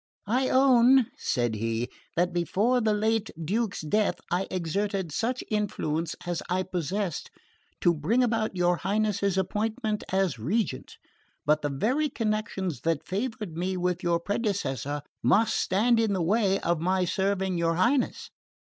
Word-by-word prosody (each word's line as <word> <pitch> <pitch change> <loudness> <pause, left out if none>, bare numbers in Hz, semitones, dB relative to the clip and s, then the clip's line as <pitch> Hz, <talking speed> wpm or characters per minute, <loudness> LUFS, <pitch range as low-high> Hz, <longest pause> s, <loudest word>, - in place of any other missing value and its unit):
"I 255 +5 +1
own," 260 -1 +5
said 120 -2 -1
he, 115 +2 -1 0.3
"that 175 +1 +1
before 205 +9 +1
the 220 -1 +2
late 220 +1 +1
Duke's 200 +6 -1
death 205 +7 +1 0.2
I 180 +2 0
exerted 190 +1 -2
such 240 - -1
influence 170 -6 -1
as 175 -1 -2
I 185 +1 +1
possessed 180 0 -3 0.5
to 175 - +4
bring 190 +12 +1
about 225 -4 0
your 175 -1 +2
Highness's 200 0 0
appointment 210 +3 -1
as 190 -9 +1
regent; 160 - -2 0.5
but 150 +1 +3
the 145 - -1
very 255 - 0
connections 215 - -2
that 165 -1 -1
favoured 210 -3 -3
me 185 +2 -2
with 180 -1 -1
your 170 -1 +1
predecessor 150 - -2 0.2
must 225 +2 +3
stand 225 +5 +2
in 220 -3 +2
the 185 -3 0
way 195 +1 +2
of 170 -1 0
my 185 +1 +1
serving 190 -1 0
your 165 0 +1
Highness. 245 +10 +1
190 Hz, 145 wpm, -27 LUFS, 170-220 Hz, 0.5 s, own